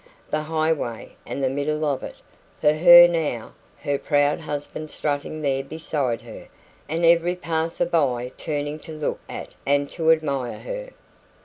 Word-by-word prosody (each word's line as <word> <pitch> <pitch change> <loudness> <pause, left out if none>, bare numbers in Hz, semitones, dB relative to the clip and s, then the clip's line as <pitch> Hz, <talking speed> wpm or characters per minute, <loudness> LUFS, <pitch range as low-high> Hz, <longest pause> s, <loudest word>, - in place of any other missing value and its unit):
The 155 - +1
highway, 155 -6 -2
and 140 - -4
the 130 - +2
middle 150 +3 -1
of 140 -3 0
it, - - -7 0.4
for 150 - +4
her 175 +2 +9
now 160 -9 -2 0.3
her 140 -1 0
proud 145 -1 +2
husband 150 0 -5
strutting 150 +1 -3
there 135 -1 0
beside 140 -4 -2
her - - -11 0.4
and 165 +2 0
every 170 +1 +4
passer 165 -2 -1
by 130 -7 0
turning 145 0 -3
to 160 - -10
look 155 -1 -3
at - - -6
and 140 0 +1
to 160 -2 0
admire 140 -6 0
her. - - -6
150 Hz, 150 wpm, -23 LUFS, 140-160 Hz, 0.4 s, her